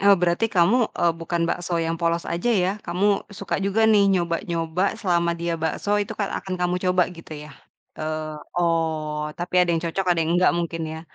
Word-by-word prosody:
Oh, 200 0 +6
berarti 180 +5 +1
kamu, 215 +6 +3
eee, 170 -1 +3
bukan 165 +1 -2
bakso 175 +1 -2
yang 165 0 -1
polos 170 0 0
aja 175 +8 -2
ya, 190 -5 +3 0.2
kamu 200 +4 +1
suka 200 -1 -4
juga 200 +3 +2
nih 210 -2 +5
nyoba-nyoba 170 +1 0
selama 170 -5 +1
dia 170 0 -2
bakso 205 +6 0
itu 215 +1 -4
kan 200 -2 -2
akan 190 -1 -4
kamu 180 0 0
coba 180 0 +4
gitu 165 -2 -12
ya? 150 - -12 0.5
Eee 155 0 -3 0.2
oh, 160 -3 0
tapi 180 +1 +1
ada 180 - +2
yang 165 -1 +1
cocok 185 +3 -2
ada 175 - +3
yang 160 - 0
engga - - +5
mungkin 170 -1 -2
ya? 160 +1 -6
175 Hz, 195 wpm, -23 LUFS, 165-195 Hz, 0.5 s, Oh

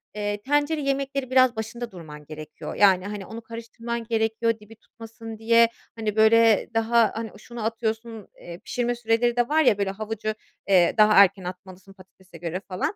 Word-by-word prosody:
eee, 205 0 -3
tencere 290 +5 0
yemekleri 275 -1 -2
biraz 255 -2 +4
başında 225 +2 -6
durman 150 -5 -11
gerekiyor. 155 0 -9
Yani, 190 -2 +4
hani, 205 -2 -6
onu 225 +3 -9
karıştırman 230 +1 -6
gerekiyor, 225 0 0
dibi 210 +1 -15
tutmasın 225 0 -11
diye. 230 +1 +4 0.3
Hani, 220 -2 -3
böyle, 220 -1 +5
daha, 225 -1 +3
hani, 225 0 -5
şunu 235 0 -7
atıyorsun, 225 -1 -4
eee, 170 0 -9
pişirme 240 +3 -2
süreleri 235 +1 +1
de 240 +2 +1
var 315 +1 +3
ya, 220 -7 +4
böyle, 200 -1 -1
havucu, 215 +1 -4 0.3
eee, 185 -3 +4
daha 215 0 +6
erken 195 -1 +5
atmalısın, 185 +1 -10
patatese 185 -2 -17
göre 170 +2 -4
falan. 190 - -3
220 Hz, 165 wpm, -24 LUFS, 195-235 Hz, 0.3 s, daha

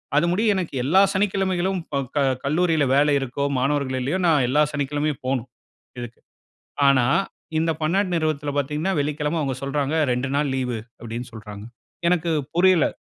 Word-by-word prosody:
அது 150 - +4
முடியும் 210 +3 +2
எனக்கு 180 -6 -3
எல்லா 165 +9 +4
சனிக்கிழமைகலும் 190 -1 0
ப - - -3 0.2
க - - +2 0.2
கல்லூரியில 160 +1 +2
வேலை 145 +1 +4
இருக்கோ, 135 +1 -3 0.2
மாணவர்கள் 135 -1 0
இல்லையோ, 145 +9 -1
நான் 150 -6 +4
எல்லா 140 +5 +3
சனிக்கிழமையும் 145 0 -2
போணும் 130 -2 -1 0.5
இதுக்கு. 120 0 -8 0.7
ஆனா, 135 -3 +5 0.5
இந்த 165 +1 +1
பன்னாட்டு 180 +4 +1
நிறுவனத்தில 155 -3 -1
பாத்தீங்கன்னா, 150 +7 -1
வெள்ளிக்கிழமை 150 +2 -1
அவுங்க 135 -3 -2
சொல்றாங்க, 140 +1 -1 0.2
"2 125 +2 -2
நாள் 145 0 +1
லீவு" 125 -3 -2 0.2
அப்டின்னு 120 +1 -6
சொல்றாங்க. 105 -2 -9 0.4
எனக்கு 170 -1 +1 0.2
புரியலை. 180 -3 +4
150 Hz, 145 wpm, -23 LUFS, 135-170 Hz, 0.7 s, ஆனா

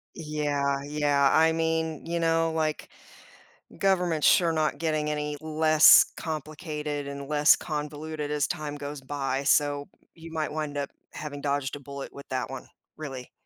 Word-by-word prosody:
Yeah, 145 -3 -1
yeah. 145 -2 +2
I 160 +1 +5
mean, 160 -1 -1
you 170 0 -1
know, 165 0 +2
like, 155 -1 -1 0.9
government's 180 -5 +2
sure 175 -4 +5
not 155 -1 0
getting 155 -2 -1
any 150 0 -3
less 155 0 +6
complicated 150 -2 -4
and 140 0 -6
less 150 0 +5
convoluted 150 0 -5
as 150 -2 +1
time 150 -1 -4
goes 145 0 -6
by, 135 0 -2
so, 145 0 +2 0.3
you 165 0 -12
might 155 -1 -2
wind 150 -2 -4
up 140 - -2 0.2
having 145 -2 -6
dodged 140 -1 -1
a - - -8
bullet 140 0 -8
with 140 - -11
that 130 -2 -2
one - - -8 0.3
really. 135 -5 -7
150 Hz, 150 wpm, -27 LUFS, 145-160 Hz, 0.9 s, less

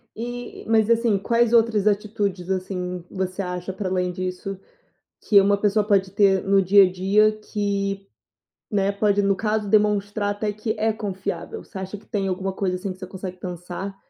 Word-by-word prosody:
E 245 +2 -6
mas, 225 0 +3
assim, 230 -3 +3
quais 235 +3 +1
outras 220 -3 +3
atitudes, 200 -3 -1
assim, 180 -1 -3
você 190 0 -3
acha, 180 0 -4
para 190 -1 -3
além 180 -1 0
disso, 185 +1 -5 0.6
que 200 -2 +5
uma 200 +1 +3
pessoa 205 0 +1
pode 195 -3 +2
ter 195 -1 +3
no 195 0 +3
dia 195 +2 +6
a 180 - +1
dia 200 +4 +3
que, 200 -2 -3 0.7
né, 200 -1 +2
pode 205 0 +2
no 200 0 +2
caso, 215 0 -1
demonstrar 205 0 +2
até 210 0 -2
que 215 +1 -3
é 220 0 +1
confiável. 190 -5 -5
Você 195 - -11
acha 190 +2 -6
que 200 - -18
tem 195 -2 -2
alguma 190 +1 -2
coisa 185 -1 -1
assim 185 +1 -4
que 185 - -19
você 185 - -7
consegue 185 -1 -7
pensar? 180 +2 -6
200 Hz, 180 wpm, -23 LUFS, 185-210 Hz, 0.7 s, dia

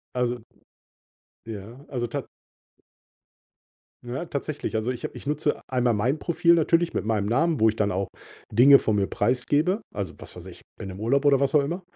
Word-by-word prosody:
Also 125 -1 -1 1.0
ja 115 +5 -9
also, 120 -3 -3
tat - - -4 1.8
ja, 125 +7 -4
tatsächlich. 145 -5 -4
Also, 110 +3 -1
ich 125 - -9
habe - - -4
ich - - -11
nutze 150 +1 0
einmal 125 -2 +2
mein 120 +8 0
Profil 170 +1 +3
natürlich 170 +1 +2
mit - - -1
meinem 105 -2 0
Namen, 155 +7 +1
wo 110 - +6
ich 110 - 0
dann 105 -2 +1
auch 95 +1 -2 0.4
Dinge 135 +6 +7
von 110 -4 0
mir 100 -1 +1
preisgebe, 145 - +1
also, 100 -5 -4
was - - -9
weiß - - -11
ich, - - -11 0.2
bin 95 - -6
im 95 +1 -8
Urlaub 135 +6 +1
oder 140 -1 +5
was 140 +2 0
auch 150 - +7
immer. 170 +7 -3
125 Hz, 185 wpm, -25 LUFS, 110-150 Hz, 1.8 s, Dinge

